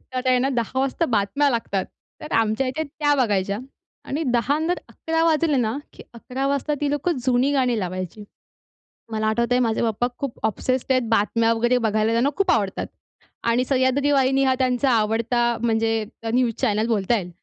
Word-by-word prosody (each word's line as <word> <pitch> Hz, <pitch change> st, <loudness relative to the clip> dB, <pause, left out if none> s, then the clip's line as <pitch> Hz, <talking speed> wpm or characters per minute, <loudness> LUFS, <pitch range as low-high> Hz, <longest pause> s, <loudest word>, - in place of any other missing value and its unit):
तर 255 Hz, -, 0 dB
त्यांना 255 Hz, +1 st, +3 dB
10:00 240 Hz, +2 st, -2 dB
वाजता 275 Hz, +5 st, 0 dB
बातम्या 275 Hz, +9 st, +2 dB
लागतात. 215 Hz, -5 st, -1 dB, 0.4 s
तर 305 Hz, -, -7 dB
आमच्या 225 Hz, +4 st, +1 dB
इथे 260 Hz, +5 st, -2 dB
त्या 290 Hz, 0 st, 0 dB
बघायच्या. 205 Hz, -6 st, 0 dB, 0.5 s
आणि 300 Hz, +4 st, -3 dB
10:00 245 Hz, +5 st, +1 dB
नंतर 340 Hz, +3 st, -1 dB
11:00 325 Hz, 0 st, -2 dB
वाजले 315 Hz, -2 st, +2 dB
ना 235 Hz, 0 st, 0 dB, 0.2 s
की -, -, -12 dB
11:00 255 Hz, +3 st, -4 dB
वाजता 280 Hz, +2 st, 0 dB
ती 290 Hz, -1 st, 0 dB
लोकं 290 Hz, +2 st, -1 dB
जुनी 255 Hz, +2 st, +2 dB
गाणी 250 Hz, -4 st, +1 dB
लावायची. 185 Hz, +2 st, -5 dB, 0.9 s
मला 215 Hz, 0 st, -1 dB
आठवतंय 235 Hz, +3 st, +1 dB
माझे 225 Hz, -3 st, +1 dB
पप्पा 230 Hz, +1 st, 0 dB
खूप 275 Hz, -4 st, -5 dB
ऑब्सेस्ट 255 Hz, +4 st, -1 dB
आहेत 255 Hz, -1 st, +3 dB
बातम्या 225 Hz, +1 st, +2 dB
वगैरे 240 Hz, +2 st, +2 dB
बघायला 220 Hz, -1 st, +1 dB
त्यांना 235 Hz, +4 st, +2 dB
खूप 390 Hz, -2 st, +2 dB
आवडतात 200 Hz, -4 st, 0 dB, 0.6 s
आणि 240 Hz, +2 st, +3 dB
सह्याद्री 265 Hz, +2 st, +2 dB
वाहिनी 270 Hz, 0 st, +3 dB
हा 265 Hz, -1 st, +3 dB
त्यांचा 255 Hz, +1 st, +1 dB
आवडता 230 Hz, +2 st, +1 dB, 0.2 s
म्हणजे 225 Hz, -1 st, +1 dB, 0.3 s
न्यूज 245 Hz, -2 st, +2 dB
चॅनल 215 Hz, +2 st, +1 dB
बोलता 225 Hz, 0 st, +1 dB
येईल 180 Hz, -3 st, -5 dB
245 Hz, 170 wpm, -23 LUFS, 225-275 Hz, 0.9 s, त्यांना